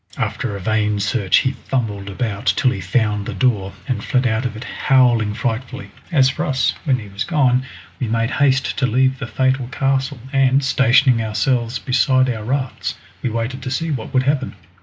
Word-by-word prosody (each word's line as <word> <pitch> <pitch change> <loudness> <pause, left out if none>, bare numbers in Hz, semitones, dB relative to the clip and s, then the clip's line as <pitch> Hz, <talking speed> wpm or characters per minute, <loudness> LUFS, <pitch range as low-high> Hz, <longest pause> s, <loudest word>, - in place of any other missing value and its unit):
After 100 - -2
a - - -5
vain 105 +1 0
search 100 -1 +2
he 130 - +2
fumbled 110 -6 -3
about 105 +1 -4
till 130 - +3
he 95 - -4
found 105 +2 0
the 115 - -4
door, 100 -3 +1 0.2
and 120 -5 -2
fled 130 -2 +1
out 120 +1 +1
of 110 - -8
it 115 - -7
howling 120 -6 +2
frightfully. 130 +2 -4 0.2
As 135 -5 +4
for 130 - -2
us, 130 -3 +1
when 135 -4 +2
he 105 -4 -9
was 100 +3 -4
gone 130 -5 +1 0.3
we 125 - -1
made 115 +2 0
haste 135 -1 +2
to 130 - +2
leave 130 +2 +2
the 125 - -4
fatal 130 +2 0
castle, 135 0 -1 0.2
and, 135 0 +3
stationing 130 -2 +4
ourselves 115 +3 0
beside 130 +1 +2
our 110 -3 -5
rafts, 130 +2 -2 0.3
we - - -1
waited 115 +3 -3
to 130 - -4
see 160 +5 -2
what 125 -6 -4
would 130 -1 +2
happen. 135 -4 -1
125 Hz, 190 wpm, -19 LUFS, 110-130 Hz, 0.3 s, As